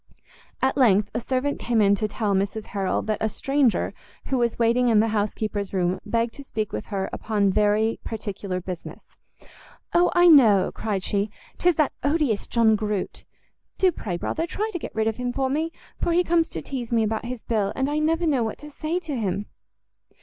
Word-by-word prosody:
At 265 +1 +2
length 210 -6 +4
a - - -1
servant 260 +3 -1
came 235 -2 0
in 200 -1 +5
to 215 +1 0
tell 210 -1 -1
Mrs 200 +3 -1
Harrel 195 -2 0
that 215 -1 -2
a 220 - +1
stranger, 270 +1 +1 0.4
who 265 - +1
was 235 -1 0
waiting 240 +2 +3
in 225 -3 +5
the 225 +1 +3
house 210 -1 0
keeper's 205 -2 -3
room, 180 -1 0
begged 230 +1 0
to 280 - -10
speak 215 -5 -4
with 105 - -4
her 195 -1 -2
upon 205 -3 +1
very 210 +2 +2
particular 200 -4 -4
business. 180 -1 -8 0.9
"O, 350 +1 +4
I 350 0 +6
know," 225 - +6
cried 200 -4 -2
she, 200 +1 0 0.3
"'tis 355 -1 +3
that 305 -2 +1
odious 285 -8 +1
John 225 -2 +4
Groot: 210 -2 -3 0.5
do 375 -1 +4
pray, 180 - -4
brother, 325 - -2
try 430 +5 -2
to 350 - -2
get - - -8
rid 220 0 +1
of 225 -1 -1
him 250 -1 -2
for 265 +1 -1
me, 315 +3 -1 0.3
for 340 - +1
he 355 +1 +4
comes 335 -1 +2
to - - -6
teize 250 -4 -5
me 230 -1 +3
about 220 +1 -2
his 245 -1 -6
bill, 210 -4 0
and 265 0 0
I 295 +1 0
never 325 +2 +1
know 275 -7 +2
what 220 - -3
to 295 +1 -11
say 310 +4 -2
to 310 -5 -4
him." 205 -3 -2
225 Hz, 205 wpm, -24 LUFS, 205-280 Hz, 0.9 s, I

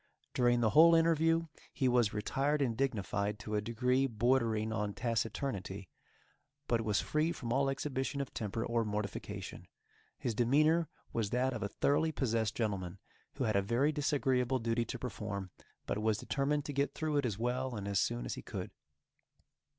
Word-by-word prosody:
During 120 -1 +3
the 110 -2 +3
whole 165 +2 +8
interview 165 0 +3 0.3
he 130 - 0
was 120 -4 +3
retired 135 +8 0
and 125 -5 +1
dignified 105 -5 -1
to 105 +1 -7
a 105 - +1
degree 125 +4 +1
bordering 115 -2 +1
on 105 -2 -2
taciturnity, 110 -4 -2 0.8
but 115 -1 +2
was 105 -2 +1
free 155 +2 +1
from 120 -7 -3
all 135 +1 +2
exhibition 135 0 -2
of 140 - -4
temper 110 +1 -3
or 115 0 +1
mortification. 105 -3 -5 0.5
His 120 - -2
demeanor 150 +8 +3 0.2
was 110 -3 0
that 130 +3 +1
of 110 - -4
a 100 - -2
thoroughly 145 +8 +1
possessed 115 -6 0
gentleman, 100 -5 -2 0.4
who 140 - -2
had 110 -4 +1
a 100 - +4
very 120 +9 +2
disagreeable 135 -4 +1
duty 115 0 0
to 125 - -5
perform, 105 -6 -5 0.3
but 100 - -2
was 110 -1 +2
determined 145 +4 -1
to 145 - -4
get 140 +1 0
through 155 -2 -1
it 140 - +1
as 105 -4 -3
well 125 +2 -1
and 100 -2 -4
as 100 -1 +1
soon - - -1
as - - -3
he - - -6
could. - - -6
120 Hz, 175 wpm, -33 LUFS, 105-140 Hz, 0.8 s, whole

